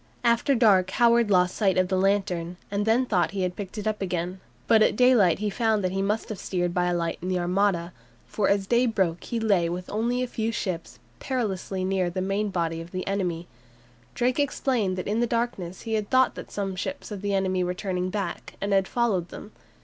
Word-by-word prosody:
After 235 +3 +3
dark 200 -6 +4
Howard 235 -2 +4
lost 180 -2 +3
sight 195 -4 +2
of 185 0 +3
the 190 - 0
lantern, 185 -3 0
and 205 +1 -1
then 235 +4 +3
thought 180 -8 +1
he 190 - 0
had 180 -1 -2
picked 205 +1 -7
it 210 - -4
up 215 -1 -1
again, 180 0 -2 0.3
but 225 -2 +5
at - - +4
daylight 235 -8 +5
he 210 0 -2
found 220 -1 +1
that 185 - 0
he 195 +1 -1
must 210 +3 -1
have 215 -4 -5
steered 175 -2 -2
by 180 0 +1
a 175 - +1
light 170 -1 -2
in 180 - -5
the 185 - +1
Armada, 180 -1 0 0.3
for 210 - 0
as 200 -1 +2
the 235 - +1
day 250 - +4
broke 190 -7 0
he 235 - -2
lay 195 -7 +2
with 180 +1 -5
only 240 +4 0
a - - -2
few 225 -1 -2
ships 185 -6 -4 0.2
perilously 195 -7 -2
near 185 -2 0
the 180 +2 -4
main 195 +3 -1
body 165 -3 -2
of 165 - -10
the 185 +1 -4
enemy. 180 -4 -2 0.7
Drake 250 +3 +1
explained 245 -9 0
that 185 - -3
in 210 +3 0
the 240 - +2
darkness 230 -7 -2
he 225 - -4
had 215 -2 -1
thought 260 0 +4
that - - -9
some 195 -2 -3
ships 230 +6 -5
of 200 -2 -5
the 200 -1 0
enemy 185 -1 +1
were 180 0 -2
turning 180 -1 -2
back, 195 -2 -4
and 200 0 -1
had 195 -1 +3
followed 205 -8 0
them. 210 - -10
195 Hz, 225 wpm, -26 LUFS, 180-220 Hz, 0.7 s, but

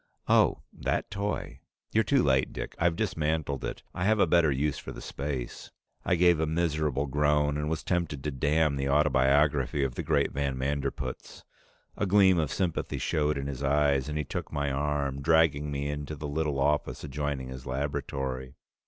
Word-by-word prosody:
Oh - - +3
that - - -2
toy. 100 +1 -3 0.3
You're 110 - +4
too 135 +6 +3
late, 65 -1 +2
Dick. - - -5
I've 85 -1 +2
dismantled 75 -4 -1
it. - - -5
I 90 - -3
have 110 +1 +3
a - - +6
better 85 -2 +4
use 70 +2 0
for - - -8
the - - -8
space." 70 -3 -5 0.3
I 90 - +2
gave 85 -1 +4
a 80 - +1
miserable 75 -4 0
groan 75 +1 +2
and 75 0 -2
was 80 -1 -2
tempted 85 -6 -1
to 75 - -2
damn 75 +2 +1
the 70 0 -1
autobiography 70 -1 +3
of 65 -2 -1
the - - -4
great 70 -3 +1
van 70 -1 -2
Manderpootz. 70 +2 -3 0.5
A 100 - 0
gleam 95 -2 +5
of 75 -4 -1
sympathy 90 -4 -1
showed 75 -1 0
in 70 - -3
his 70 -1 -5
eyes, 70 -1 +2
and 75 - -3
he 75 - 0
took - - -5
my 70 -2 -1
arm, 70 -1 -1
dragging 80 -1 +3
me 70 0 -2
into 75 +1 -4
the 75 +1 -5
little 75 -1 -1
office 70 -2 0
adjoining 70 -2 -3
his 65 +1 -8
laboratory. 65 -1 -3
75 Hz, 180 wpm, -28 LUFS, 70-80 Hz, 0.5 s, a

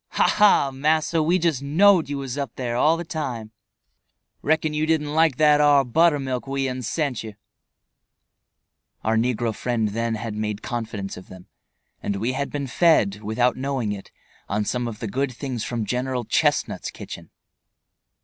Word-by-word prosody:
"Ha - - +3
ha! 205 -10 +4
massa! 155 +4 +1
we 170 +4 +3
just 165 -7 0
knowed 165 +3 +4
you 145 - -2
was 135 -2 -4
up 140 -5 -4
there 120 -2 -3
all 155 +6 +3
the 170 - -4
time. 125 -9 -4 0.9
Reckon 155 0 +1
you 155 +1 0
didn't 150 -2 0
like 160 -4 +3
that 150 -1 +5
ar 145 -2 +5
buttermilk 135 -2 +1
what 135 - -5
we'uns 130 -3 -2
sent 145 -7 -1
you." 110 -2 -8 1.7
Our 110 +1 +1
negro 115 0 0
friend 115 -2 -1
then 115 +2 -1
had 110 0 -5
made 105 -1 -3
confidents 110 -5 -4
of 90 - -11
them, 95 -1 -12 0.6
and 100 - -2
we 110 +6 -1
had 140 +2 -2
been 145 -1 -3
fed, 120 - +3
without 120 +4 +1
knowing 130 -5 -2
it, 100 -1 -7 0.4
on 105 +1 0
some 125 +1 -1
of 115 -2 -6
the 115 - -3
good 130 +6 -1
things 125 -2 -5
from 115 -3 -3
General 125 +2 -2
Chestnut's - - 0
kitchen. - - -9
130 Hz, 170 wpm, -23 LUFS, 115-150 Hz, 1.7 s, that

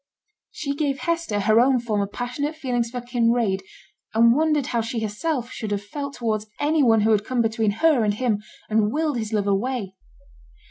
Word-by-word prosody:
She 280 -2 -4
gave 280 -2 -1
Hester 330 -9 -1
her 215 +3 +4
own 255 +1 +4
former 210 -4 -1
passionate 250 +8 -3
feelings 245 -6 -1
for 245 +1 -5
Kinraid, 235 -5 +1 0.5
and 230 +1 +6
wondered 305 -2 +2
how 235 -3 0
she 230 0 -3
herself 240 +4 -2
should 215 - -5
have 205 -1 -2
felt 280 +5 -5
towards 215 -3 -2
any 305 +1 +2
one 225 -4 +4
who 220 +2 +3
had 210 -1 +3
come 245 +1 0
between 225 -1 +1 0.2
her 295 -8 +5
and 205 -1 +1
him, 215 -3 0 0.3
and 215 -1 +2
wiled 300 -2 0
his 220 -1 -4
love 210 -2 0
away. 200 0 -1
235 Hz, 185 wpm, -23 LUFS, 215-270 Hz, 0.5 s, and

